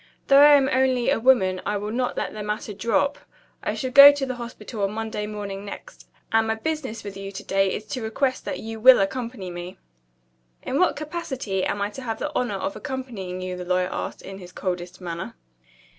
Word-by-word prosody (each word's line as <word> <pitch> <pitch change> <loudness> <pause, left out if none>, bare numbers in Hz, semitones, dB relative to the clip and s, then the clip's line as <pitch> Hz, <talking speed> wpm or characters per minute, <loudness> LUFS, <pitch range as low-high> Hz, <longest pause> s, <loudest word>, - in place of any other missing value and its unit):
Though 275 0 +8
I 295 +1 +9
am 275 -2 +4
only 260 -2 +2
a - - +2
woman, 205 -7 +3
I 205 0 -1
will 210 +1 -4
not 250 +2 -1
let - - -2
the 215 - -6
matter 210 0 -4
drop. 235 +7 0 0.4
I - - -2
shall 260 -2 -3
go 280 +2 +11
to 285 -1 -2
the 255 - -3
Hospital 235 -3 -7
on 200 +1 0
Monday 220 -1 -3
morning 200 -2 -6
next 205 - -10 0.2
and 225 0 +3
my 220 - +1
business 260 -2 -4
with 200 -1 -7
you 195 0 -7
to 200 +1 -8
day 195 -1 +1
is 215 - -4
to 255 - -3
request 255 +4 -1
that - - -3
you 225 0 -6
will 255 +3 +8
accompany 200 -2 -3
me." 175 +1 -7 0.9
"In 275 - -1
what 365 - +3
capacity 275 - -3
am 200 - -1
I 205 - -2
to 265 - -8
have 225 -3 -3
the 295 - -3
honor 245 -5 0
of 195 - -3
accompanying 235 -10 -5
you?" 185 0 -4
the 180 - -6
lawyer 180 0 0
asked, - - -5
in 195 0 -8
his 180 -1 -11
coldest 180 0 -4
manner. 170 -9 -6
220 Hz, 215 wpm, -24 LUFS, 195-260 Hz, 0.9 s, go